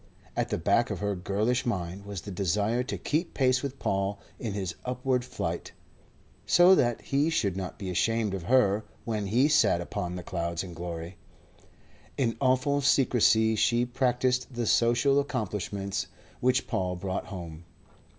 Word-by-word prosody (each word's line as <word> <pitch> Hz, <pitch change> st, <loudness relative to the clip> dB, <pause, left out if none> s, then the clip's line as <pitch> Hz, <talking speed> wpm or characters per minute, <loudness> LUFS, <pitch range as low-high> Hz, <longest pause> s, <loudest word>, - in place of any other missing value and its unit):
At -, -, -1 dB
the -, -, -1 dB
back -, -, +2 dB
of -, -, -3 dB
her 105 Hz, 0 st, -1 dB
girlish 105 Hz, +7 st, 0 dB
mind 95 Hz, -3 st, -3 dB
was 100 Hz, -3 st, -5 dB
the 100 Hz, -, -8 dB
desire 100 Hz, +5 st, 0 dB
to 125 Hz, -, -4 dB
keep 165 Hz, +3 st, -2 dB
pace 130 Hz, -1 st, +3 dB
with 140 Hz, -1 st, -5 dB
Paul 100 Hz, -1 st, -1 dB, 0.2 s
in 110 Hz, -4 st, -3 dB
his 95 Hz, -4 st, -3 dB
upward 125 Hz, 0 st, -1 dB
flight, 125 Hz, -, -4 dB, 0.7 s
so 180 Hz, +2 st, +7 dB
that 120 Hz, -9 st, +2 dB
he 140 Hz, +3 st, +1 dB
should 105 Hz, -, 0 dB
not 95 Hz, -1 st, -5 dB
be 100 Hz, -, -6 dB
ashamed 110 Hz, +2 st, +1 dB
of 95 Hz, -4 st, -4 dB
her 110 Hz, -3 st, +3 dB, 0.2 s
when 110 Hz, -3 st, -2 dB
he 120 Hz, +8 st, +3 dB
sat 150 Hz, -, +4 dB
upon 90 Hz, 0 st, -4 dB
the 90 Hz, -, -6 dB
clouds 85 Hz, -1 st, -3 dB
in 90 Hz, -2 st, -8 dB
glory. 85 Hz, +1 st, -6 dB, 1.0 s
In 120 Hz, -4 st, +1 dB
awful 130 Hz, +2 st, +2 dB
secrecy 115 Hz, -5 st, +4 dB
she 120 Hz, +3 st, +2 dB
practised 125 Hz, 0 st, 0 dB
the 120 Hz, -1 st, -1 dB
social 120 Hz, +5 st, +3 dB
accomplishments 105 Hz, -, -3 dB, 0.3 s
which 125 Hz, +1 st, +2 dB
Paul 95 Hz, -5 st, -1 dB
brought 95 Hz, +1 st, -4 dB
home. 85 Hz, -4 st, -8 dB
110 Hz, 160 wpm, -28 LUFS, 95-125 Hz, 1.0 s, so